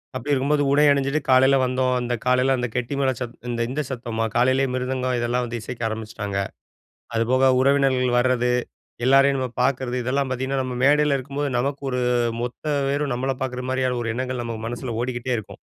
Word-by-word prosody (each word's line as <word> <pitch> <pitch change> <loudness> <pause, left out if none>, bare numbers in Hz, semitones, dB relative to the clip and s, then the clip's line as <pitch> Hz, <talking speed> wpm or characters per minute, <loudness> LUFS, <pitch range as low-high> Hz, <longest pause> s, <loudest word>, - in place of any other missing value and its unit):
அப்பிடி 145 +3 -3
இருக்கும்போது 145 +2 +2
உடை 145 +1 +5
அணிஞ்சுட்டு 140 +1 +1
காலையில் 130 +1 +6
வந்தோம். 130 0 +1
அந்த 120 0 -2
காலையில 125 +1 +3
அந்த 120 -1 -1
கெட்டி 125 +2 -2
மேல 135 -1 +2
சத் 120 -1 -5
இந்த, 120 -1 -3
இந்த 140 +4 -2
சத்தமா, 115 -3 -3
காலையிலேயே 130 +2 +3
மிருதங்கம் 130 0 -1
இதெல்லாம் 120 +1 0
வந்து 120 0 -4
இசைக்க 120 +2 -7
ஆரம்பிச்சுட்டாங்க. 110 -2 -5 0.8
அதுபோக 130 +3 +3
உறவினர்கள் 130 -2 +3
வர்றது. 125 0 +2 0.5
எல்லாரையும் 135 +1 +5
நம்ம 130 -1 -1
பார்க்கிறது 125 -1 0
இதெல்லாம் 135 +2 0
பாத்தீங்கன்னா, 130 +1 -1
நம்ம 130 -1 -4
மேடையில 145 0 +4
இருக்கும்போது 140 +2 -3
நமக்கு 140 +3 -2
ஒரு 125 -1 -1 0.4
மொத்த 125 +4 -6 0.3
பேரும் 145 -1 -1
நம்மள 130 +2 -1
பாக்குற 125 -1 -3
மாரியான 130 -1 0
ஒரு 115 - -2
எண்ணங்கள் 130 0 -3
நம்ம 115 -1 -4
மனசுல 120 +1 -4
ஓடிக்கிட்டே 125 0 -2
இருக்கும். 105 - -9
130 Hz, 170 wpm, -23 LUFS, 120-135 Hz, 0.8 s, காலையில்